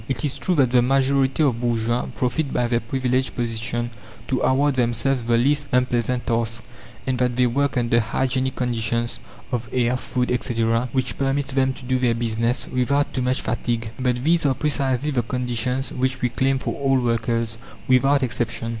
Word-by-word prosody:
It 130 +1 -1
is 140 - -2
true 185 - 0
that 135 -5 +3
the 125 -1 +5
majority 135 +2 +2
of 125 -5 +1
bourgeois 120 0 0
profit 135 +3 -1
by 125 - +1
their 120 0 +1
privileged 130 +1 -1
position 120 0 -2 0.4
to 130 - 0
award 140 +2 +2
themselves 120 +1 0
the 115 0 +2
least 145 +4 +2
unpleasant 125 0 +1
tasks, 115 -1 -1 0.4
and 130 -2 -1
that 125 -1 +1
they 125 0 +3
work 135 +2 0
under 120 -1 +3
hygienic 130 +3 -1
conditions 115 -1 -1 0.3
of 120 -2 -3
air, 125 0 +1
food, 125 -1 -2
etc., 115 0 0
which 130 -2 -2
permits 140 +1 0
them 130 0 +2
to 130 - -12
do 130 0 +1
their 120 -2 +2
business 115 +1 -1
without 140 +3 +1
too 130 - -1
much 125 +1 0
fatigue. 115 -2 -2
But 125 -1 0
these 165 +3 +3
are 135 - +2
precisely 140 -1 0
the 125 -4 +1
conditions 125 +1 -2
which 130 0 -1
we 125 - +1
claim 135 +3 +1
for - - -3
all 135 -1 +3
workers, 115 -1 -1 0.3
without 135 +2 +4
exception. 115 -1 -2
125 Hz, 180 wpm, -23 LUFS, 120-130 Hz, 0.4 s, the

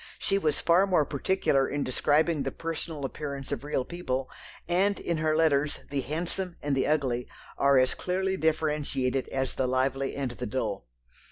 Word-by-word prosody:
She 195 - +1
was 155 -6 +1
far 180 +4 +4
more 175 -6 +3
particular 140 -3 +1
in 145 0 -1
describing 150 +4 +2
the - - -2
personal 165 -3 -4
appearance 140 -1 -5
of - - -3
real 145 -3 -1
people, 135 -7 -3 0.4
and 195 +4 +2
in 170 - -1
her 155 0 +1
letters 150 -2 +2
the 140 -1 0
handsome 175 +5 -4
and 145 -1 -1
the 135 - +1
ugly 130 -5 0 0.3
are 140 0 +4
as 130 0 +4
clearly 190 +1 -1
differentiated 150 -5 0
as 135 -1 -2
the 130 - 0
lively 135 +1 0
and 135 -3 -2
the 120 - -5
dull. 105 - -3
145 Hz, 170 wpm, -28 LUFS, 135-165 Hz, 0.4 s, far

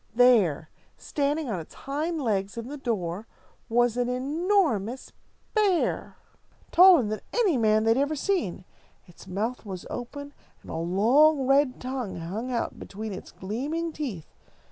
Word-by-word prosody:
There, 215 - +4 0.3
standing 290 +1 -1
on 205 -7 -2
its 160 - -11
hind 310 +4 -3
legs 205 -1 -1
in 230 +2 -5
the 295 - -6
door, 210 -6 -3 0.4
was 240 0 +2
an 245 0 0
enormous 270 - 0 0.4
bear, 405 -6 +1 0.5
taller 360 -6 +8
than 215 0 -3
any 420 -10 +2
man 215 -2 +3
they 225 - +3
had 230 - +3
ever 285 +2 +1
seen. 280 - -1 0.4
Its 175 0 -16
mouth 215 +7 -3
was 190 -4 -7
open, 285 +4 -6 0.3
and - - -10
a - - -4
long 245 - +3
red 275 -1 +3
tongue 255 -5 -4
hung 195 +9 -5
out 235 - -2
between 215 +1 -6
its 185 - -9
gleaming 290 - -3
teeth. 235 - -6
245 Hz, 145 wpm, -26 LUFS, 210-290 Hz, 0.5 s, taller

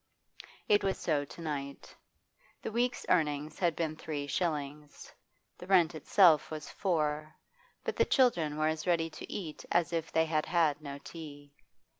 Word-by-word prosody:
It 205 -1 +4
was 195 -1 0
so 145 -3 0
to 170 - -11
night. 140 -3 -5 0.7
The - - -3
week's 240 +3 0
earnings 150 -3 +1
had 170 -4 +2
been 160 -2 -2
three 150 -2 -4
shillings; 150 -2 -3 0.5
the 180 - -9
rent 175 -4 +4
itself 160 0 +4
was 155 -1 -6
four. 155 -4 -1 0.5
But - - -2
the - - +4
children 170 - +2
were 155 0 +2
as 155 +2 -2
ready 165 -2 +1
to - - -9
eat 165 -7 -6
as 175 -1 +2
if 165 -1 -2
they 160 0 +3
had 155 -1 0
had 160 -3 +2
no 140 -2 -6
tea. 145 -2 -10
155 Hz, 160 wpm, -31 LUFS, 150-175 Hz, 0.7 s, It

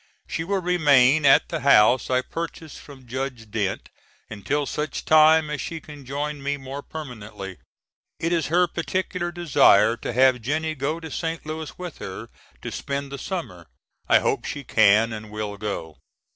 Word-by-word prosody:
She 165 - -3
will 190 +2 -1
remain 145 -4 +4
at 135 - +5
the - - -2
house 125 -2 +5
I 130 0 +2
purchased 165 0 -7
from 135 -3 -14
Judge 125 -3 -5
Dent 100 -3 -2 0.4
until 140 +8 -2
such 150 +2 -4
time 155 0 +5
as 150 - -3
she 165 -1 -5
can 145 -4 -12
join 145 +1 -3
me 140 +1 -2
more 135 +1 -7
permanently. 105 - -8 0.6
It 165 +1 0
is 165 -4 0
her 175 +3 +3
particular 175 0 -3
desire 150 - +4
to - - -5
have 130 0 +4
Jennie 155 +6 -1
go 150 +3 -2
to 160 -2 -9
St. 165 +1 -4
Louis 155 0 -6
with 180 -3 -8
her 95 - -7 0.3
to - - -5
spend 140 0 -4
the 140 - -6
summer. 125 - -6 0.4
I - - +7
hope - - 0
she 140 - -5
can 110 -1 +4
and 110 0 -8
will 105 -1 -5
go. 100 -7 -5
140 Hz, 170 wpm, -24 LUFS, 120-160 Hz, 0.6 s, I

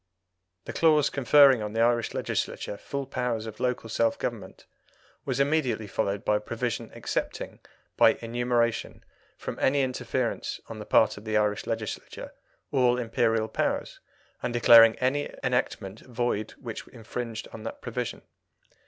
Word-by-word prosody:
The - - -6
clause 155 -3 +4
conferring 135 -2 +6
on 105 0 -4
the 115 - -2
Irish 120 0 +2
Legislature - - -2
full 140 +6 -5
powers 125 -4 -2
of 110 -1 -8
local 125 -2 -1
self 115 +1 +1
government - - -5 0.6
was 130 -1 -1
immediately 140 -6 +1
followed 100 0 -2
by 105 - +3
a - - -3
provision 115 +2 -3
excepting, - - -4 0.4
by - - +6
enumeration, 120 0 -1 0.3
from - - -6
any 140 +1 +3
interference 130 -1 -2
on 110 - -8
the 105 - -8
part 110 -1 +4
of 105 - -10
the 110 -1 0
Irish 105 -1 0
Legislature, 115 -1 -5 0.4
all 125 -2 +3
Imperial 115 -2 +1
powers, - - -2 0.4
and 125 - -2
declaring 115 -1 +8
any 135 +3 0
enactment 110 -5 -1
void 120 -3 -2
which - - -7
infringed 115 0 -6
on 110 - -8
that - - -6
provision. - - -4
115 Hz, 145 wpm, -27 LUFS, 110-125 Hz, 0.6 s, declaring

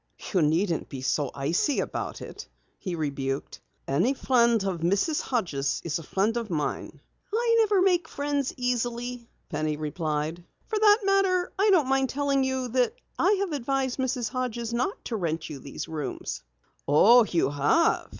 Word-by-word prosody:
"You 185 - +3
needn't 165 +3 +1
be 135 -3 -6
so 130 +2 0
icy 165 - 0
about - - -4
it," - - -9 0.3
he 185 -3 -4
rebuked. 140 -3 -3 0.3
"Any 180 - +2
friend 235 -5 +3
of 190 -3 -2
Mrs. 200 - +1
Hodges' 165 - -1
is 170 0 -1
a - - -7
friend 200 +8 0
of 230 -2 -3
mine." 155 -4 -3 0.3
"I 460 +2 +2
never 415 -4 +4
make 360 -2 +2
friends 285 -1 -2
easily," 245 -1 -2 0.2
Penny 155 -2 -2
replied. 155 +1 -3 0.2
"For 435 -2 -2
that 415 -1 +6
matter, 390 -2 +2
I 415 +2 +4
don't 340 -9 +4
mind 270 0 +2
telling 280 -1 +1
you 260 -1 -1
that 255 - +1 0.2
I 385 - +4
have 395 -4 -1
advised 270 -1 -1
Mrs. 250 -3 -1
Hodges 240 -1 -3
not 255 +12 -2
to 235 - -3
rent 165 -5 -2
you 140 - -7
these 140 - -7
rooms." 155 -3 -5 0.5
"Oh, 225 +12 +7
you 170 -8 0
have?" 145 - +2
235 Hz, 160 wpm, -27 LUFS, -, 0.5 s, Oh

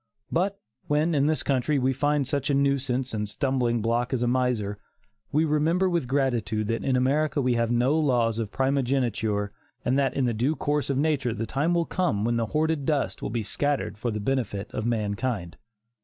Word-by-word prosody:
But 195 +4 0 0.3
when, 150 +3 +2
in 145 -1 +3
this 155 0 0
country, 140 +2 +1
we 130 0 +2
find 145 0 +1
such 140 -1 -1
a 140 - +3
nuisance 135 -2 0
and 105 -1 -2
stumbling 120 -1 0
block 120 +3 0
as 125 - -1
a - - +1
miser, 120 -5 0 0.5
we 155 +2 +3
remember 160 +5 +2
with 170 -7 0
gratitude 120 -5 0
that 115 - -1
in 130 - +1
America 145 +4 +1
we 130 -2 +2
have 115 -1 +1
no 120 +5 +2
laws 120 -6 +2
of 110 -3 -2
primogeniture, 120 -6 0 0.3
and 130 +3 +2
that 135 -1 +1
in 135 - +1
the 120 - +1
due 125 +8 0
course 145 +1 -1
of 135 - 0
nature 140 -5 +1
the 115 - -2
time 150 +9 0
will 170 -1 +2
come 120 - 0
when 120 0 +1
the 115 -1 0
hoarded 155 +2 0
dust 145 -1 -1
will - - -3
be 115 +1 -2
scattered 145 +6 -1
for 110 +4 -3
the 105 -1 -2
benefit 110 -4 -2
of 110 +1 -2
mankind. 105 -4 -2
130 Hz, 200 wpm, -26 LUFS, 115-145 Hz, 0.5 s, in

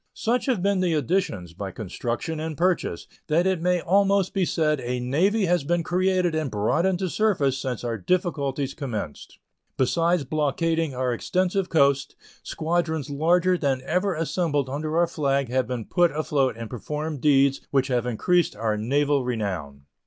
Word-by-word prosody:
Such 245 +4 0
have 235 -9 +1
been 200 -1 +2
the 175 -3 +1
additions, 125 - -1
by 95 +2 -5
construction 115 - -4
and 155 -1 -4
purchase, 175 - 0 0.2
that 165 +4 +2
it 190 -3 +1
may 180 0 +2
almost 195 +1 +2
be 190 -2 +1
said 155 -3 +1
a 125 0 -3
navy 180 - +1
has 175 -3 +1
been 175 +3 0
created 185 0 +1
and 155 -3 -1
brought 110 - +1
into 190 0 0
service 175 -9 +1
since 125 -3 -4
our 115 -2 -3
difficulties 140 - -1
commenced. 110 - -6 0.4
Besides 165 +5 +2
blockading 155 +1 0
our 125 -1 0
extensive 185 - 0
coast, 140 -3 +2 0.3
squadrons 160 -3 -2
larger 175 +5 +2
than 135 -3 0
ever 180 +7 0
before 165 0 -1
assembled 145 -6 -1
under 155 +3 -2
our 175 - +5
flag 140 -5 -1
have 130 -1 0
been 120 -3 -4
put 175 -1 +3
afloat 145 -5 0
and 115 -1 -6
performed 150 +5 -5
deeds 140 -2 +3
which 135 -1 +1
have 125 -1 0
increased 175 +9 +1
our 110 0 -1
naval 140 +5 +1
renown. 95 - -4
150 Hz, 165 wpm, -25 LUFS, 130-175 Hz, 0.4 s, our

